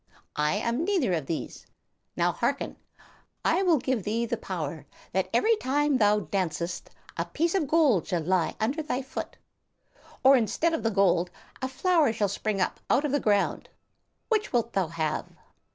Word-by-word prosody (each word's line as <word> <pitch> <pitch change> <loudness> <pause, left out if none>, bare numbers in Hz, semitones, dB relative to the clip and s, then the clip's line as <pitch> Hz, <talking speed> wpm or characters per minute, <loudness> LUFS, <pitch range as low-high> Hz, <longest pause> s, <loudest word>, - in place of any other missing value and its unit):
I 150 +5 +2
am 235 +7 -1
neither 345 - +1
of 155 -5 -2
these. 165 - -5 0.5
Now, - - +3
hearken. - - -2 0.7
I - - +3
will 350 -5 +4
give 260 -3 -1
thee 225 +5 -1
the 235 +1 -1
power - - -5 0.2
that - - 0
every 455 +1 +3
time 290 -3 +1
thou 210 0 +4
dancest 175 -1 -3 0.3
a - - -1
piece 335 +2 -1
of 360 -7 +1
gold 285 - +3
shall 170 -3 -1
lie 180 0 +1
under 260 +9 0
thy 275 -4 -2
foot 265 - -6 0.9
or, 270 +1 +8
instead 270 +8 +1
of 325 - -1
the 225 - +1
gold, 190 -4 +2 0.3
a 260 - 0
flower 315 +1 +2
shall 210 -3 0
spring 205 +1 -2
up 185 - -1
out 290 - +3
of 290 - -1
the 285 - +2
ground; 205 -4 +1 0.6
which 430 -2 0
wilt 235 -2 0
thou 190 -3 +1
have?" 155 -1 -2
235 Hz, 170 wpm, -27 LUFS, 190-295 Hz, 0.9 s, or